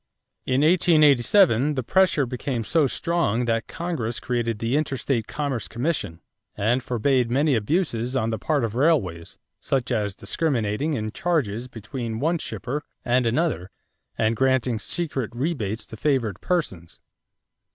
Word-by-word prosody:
In 130 +1 +2
1887, 150 - +4
the 130 - -1
pressure 185 -1 +3
became 125 -1 -3
so 155 +5 +3
strong 130 -7 0
that 115 -1 0
Congress 155 -10 -3
created 120 -3 -1
the 115 +4 -1
interstate 135 -5 -1
commerce 140 -5 -3
commission 115 - -2 0.3
and 120 +6 +1
forbade 125 0 +1
many 140 +4 +2
abuses 125 - 0
on 115 -3 0
the 110 - -3
part 150 -4 0
of 115 -2 -2
railways; 120 - 0 0.2
such 130 -2 -1
as 105 -4 -1
discriminating 140 0 -1
in 110 -3 -3
charges 125 -8 -1
between 115 -1 -5
one 165 +5 +1
shipper 145 +1 -4 0.2
and 120 0 +2
another 120 - 0 0.5
and 110 +1 +1
granting 130 -2 +1
secret 135 - -2
rebates 120 - -2
to - - -10
favored 125 -5 0
persons. 95 - -2
125 Hz, 135 wpm, -24 LUFS, 115-150 Hz, 0.5 s, 1887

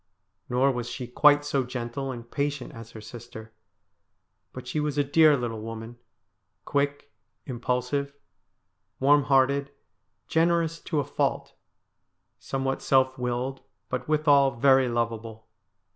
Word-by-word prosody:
Nor 130 +3 +3
was 120 -2 -4
she 125 - -5
quite 145 +4 +4
so 140 -2 0
gentle 125 +2 -4
and 120 -2 -9
patient 145 -1 -2
as 115 0 -10
her 110 - -11
sister, 110 -1 -11 1.0
but 125 -1 -9
she 150 - -2
was 150 -1 -2
a 145 - +3
dear 150 +1 +5
little 115 -3 -4
woman 115 +1 -8 0.3
— - - -51
quick, 145 -2 -1 0.3
impulsive, 125 +3 -2 0.8
warm 140 +1 +4
hearted, 140 +1 +3 0.6
generous 165 0 +1
to 155 - 0
a - - -5
fault, 145 - -2 0.9
somewhat 135 0 -2
self 130 -1 +2
willed 125 +2 -2 0.3
but 125 - -3
withal 145 -3 +4
very 135 0 +4
lovable. 115 -1 -3
130 Hz, 130 wpm, -26 LUFS, 120-145 Hz, 1.0 s, dear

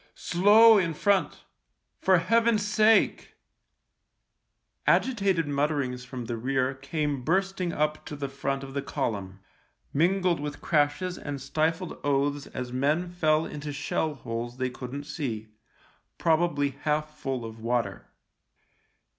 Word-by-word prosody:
"Slow 210 +5 +6
in 165 -4 -1
front 190 -3 +1 0.3
— - - -49
for 190 -1 +5
Heaven's 225 +4 +2
sake." 215 +1 +3 1.5
Agitated 195 - +2
mutterings 140 -3 -1
from 125 -1 -6
the 115 +1 -3
rear 130 +2 0
came 140 0 -3
bursting 190 +2 0
up 150 -1 -1
to 150 - -6
the 140 -1 -4
front 135 0 -3
of 135 0 -8
the 140 - -1
column, 100 -9 -4 0.5
mingled 180 +2 +2
with 145 0 -5
crashes 160 +4 0
and 145 -2 -5
stifled 160 +5 -1
oaths 145 0 0
as 125 -1 -6
men 150 +7 0
fell 160 -2 +2
into 150 0 -6
shell 145 +1 -2
holes 120 -1 -5
they 130 -1 -1
couldn't 130 +3 -6
see, 120 -8 -4 0.7
probably 160 -3 +2
half 150 0 -1
full 130 -4 -3
of 115 0 -9
water. 120 +1 -2
145 Hz, 130 wpm, -27 LUFS, 135-175 Hz, 1.5 s, Slow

